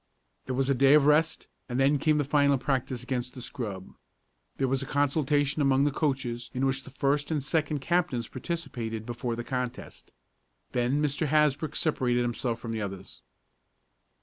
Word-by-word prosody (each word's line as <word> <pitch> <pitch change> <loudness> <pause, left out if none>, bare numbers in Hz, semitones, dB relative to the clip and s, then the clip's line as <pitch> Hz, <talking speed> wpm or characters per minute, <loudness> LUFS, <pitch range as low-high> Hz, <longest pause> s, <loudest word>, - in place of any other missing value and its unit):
There 130 - -2
was 135 0 +1
a 140 - +3
day 135 +2 +5
of 150 -2 +5
rest, 155 +2 +2 0.2
and 125 +1 -1
then 140 +2 +3
came 155 +1 +3
the 145 - +2
final 140 0 +3
practice 130 -2 -2
against 125 0 -3
the - - -7
scrub. 105 -8 -6 0.7
There 135 - +1
was 135 +1 0
a 135 - -5
consultation 145 +1 +1
among 135 -1 +3
the 145 - +2
coaches 130 -5 -2
in 130 +2 +1
which 135 0 0
the 135 - -12
first 140 +1 0
and 150 -4 -1
second 150 -1 0
captains 165 -8 0
participated 125 -8 -4
before 120 0 -3
the 120 - -4
contest. 125 -1 -5 0.6
Then 125 +4 +1
Mr. 145 +1 0
Hasbrook 150 0 +2
separated 125 -6 +1
himself 120 0 -2
from 115 -1 -6
the 110 -1 -3
others. 95 -1 -7
135 Hz, 175 wpm, -28 LUFS, 125-145 Hz, 0.7 s, day